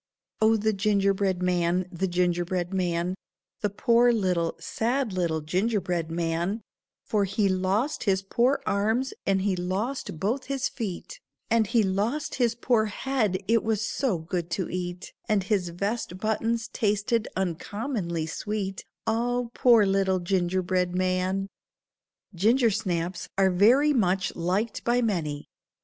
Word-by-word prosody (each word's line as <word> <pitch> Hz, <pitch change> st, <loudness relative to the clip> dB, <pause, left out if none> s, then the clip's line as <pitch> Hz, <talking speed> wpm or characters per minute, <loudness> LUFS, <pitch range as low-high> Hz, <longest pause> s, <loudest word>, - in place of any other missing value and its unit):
"Oh 220 Hz, +1 st, +5 dB
the 220 Hz, +1 st, +1 dB
ginger 200 Hz, -1 st, +2 dB
bread 190 Hz, -2 st, -1 dB
man, 180 Hz, 0 st, +1 dB
the 190 Hz, +1 st, -1 dB
ginger 175 Hz, -1 st, +1 dB
bread 180 Hz, +1 st, -3 dB
man, 175 Hz, -1 st, 0 dB, 0.5 s
The 210 Hz, -, 0 dB
poor 235 Hz, +4 st, +4 dB
little, 180 Hz, -7 st, 0 dB
sad 240 Hz, -1 st, -1 dB
little 170 Hz, -4 st, 0 dB
ginger 195 Hz, +8 st, 0 dB
bread 175 Hz, -3 st, -2 dB
man, 170 Hz, +5 st, -1 dB, 0.4 s
For 205 Hz, -2 st, +1 dB
he 200 Hz, +1 st, +1 dB
lost 195 Hz, +9 st, 0 dB
his 195 Hz, -2 st, +2 dB
poor 245 Hz, +7 st, +1 dB
arms, 220 Hz, +6 st, 0 dB
and 195 Hz, -1 st, +2 dB
he 195 Hz, -2 st, +1 dB
lost 185 Hz, -, -3 dB
both 235 Hz, -, -1 dB
his 275 Hz, 0 st, -1 dB
feet, 225 Hz, -, -6 dB, 0.3 s
And 225 Hz, -2 st, +3 dB
he 225 Hz, +2 st, +3 dB
lost 210 Hz, +10 st, -1 dB
his 235 Hz, -1 st, +2 dB
poor 235 Hz, -2 st, +2 dB
head, 210 Hz, -3 st, -1 dB
it 230 Hz, 0 st, +3 dB
was 220 Hz, -1 st, 0 dB
so 245 Hz, -4 st, 0 dB
good 170 Hz, +1 st, -4 dB
to 185 Hz, -, -2 dB
eat, 180 Hz, 0 st, -5 dB, 0.2 s
And 210 Hz, -3 st, +2 dB
his 190 Hz, -3 st, 0 dB
vest 200 Hz, +2 st, -3 dB
buttons 225 Hz, +3 st, -1 dB
tasted 215 Hz, +2 st, 0 dB
uncommonly 185 Hz, -, -2 dB
sweet, 195 Hz, +3 st, -4 dB, 0.2 s
Ah, 240 Hz, +2 st, 0 dB
poor 235 Hz, -4 st, +5 dB
little 195 Hz, -1 st, +2 dB
ginger 185 Hz, 0 st, 0 dB
bread 180 Hz, 0 st, 0 dB
man." 185 Hz, +1 st, 0 dB, 0.9 s
Gingersnaps 190 Hz, -4 st, +1 dB
are 190 Hz, -1 st, +4 dB
very 245 Hz, +11 st, +5 dB
much 190 Hz, -6 st, +1 dB
liked 185 Hz, +7 st, -1 dB
by 240 Hz, +1 st, +2 dB
many. 155 Hz, -9 st, -2 dB
195 Hz, 140 wpm, -26 LUFS, 180-225 Hz, 0.9 s, Oh